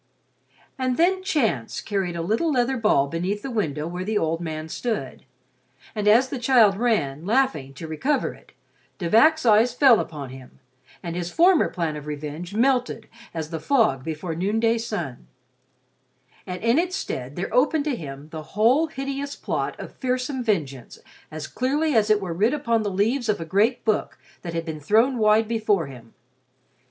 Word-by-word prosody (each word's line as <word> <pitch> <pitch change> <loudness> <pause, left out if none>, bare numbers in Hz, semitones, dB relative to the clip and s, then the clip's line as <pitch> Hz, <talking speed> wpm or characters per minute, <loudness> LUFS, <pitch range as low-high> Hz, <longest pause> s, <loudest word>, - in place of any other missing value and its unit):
And 255 -1 0
then 370 +3 +3
Chance 225 - -1
carried 195 -4 -2
a 170 - -3
little 225 - 0
leather 260 -1 +1
ball 210 - +3
beneath 180 +7 -3
the 270 - -4
window 155 - -2
where 180 +2 -4
the 215 +2 -1
old 165 -2 -1
man 155 -1 -5
stood; 225 +6 -4 0.7
and 210 -1 -2
as 240 +5 +5
the 265 - -4
child 230 -5 +5
ran, 195 - 0
laughing, 210 - 0
to 165 - -7
recover 260 - -1
it, - - -20 0.4
De 175 - -3
Vac's 310 - +4
eyes 230 +2 +4
fell 255 -4 +6
upon 145 -5 -5
him, 130 -1 -13 0.5
and 170 -1 -4
his 175 -1 -3
former 345 - +4
plan 165 -3 -2
for 150 - -6
revenge 150 +5 -6
melted 245 -1 +1 0.2
as 160 -1 -5
the 165 - -3
fog 160 - +2
before 160 +2 -4
the 160 - -6
noonday 225 +3 +1
sun; 170 - -5 1.2
and 180 +2 -6
in 230 +6 +3
its 365 +2 -1
stead 135 - -5
there 185 - -4
opened 290 +3 +2
to 295 -4 0
him 145 -5 -8
the 160 -1 -6 0.2
whole 255 +9 +4
hideous 275 -1 -5
plot - - -3
of - - -8
fearsome 255 0 -2
vengeance 145 - -2 0.3
as 155 -1 -6
clearly 290 +5 0
as 220 -2 +3
it 215 -1 +4
were 185 -4 -4
writ 215 - +2
upon 235 -6 0
the 210 - -1
leaves 220 +6 0
of 210 - +1
a 165 - -5
great 210 +9 +1
book 215 -2 0 0.2
that 170 -2 -6
had 165 0 -2
been 160 -2 -5
thrown 225 - +2
wide 215 +1 +4
before 215 -6 +1
him. 120 -4 -13
210 Hz, 180 wpm, -24 LUFS, 160-250 Hz, 1.2 s, fell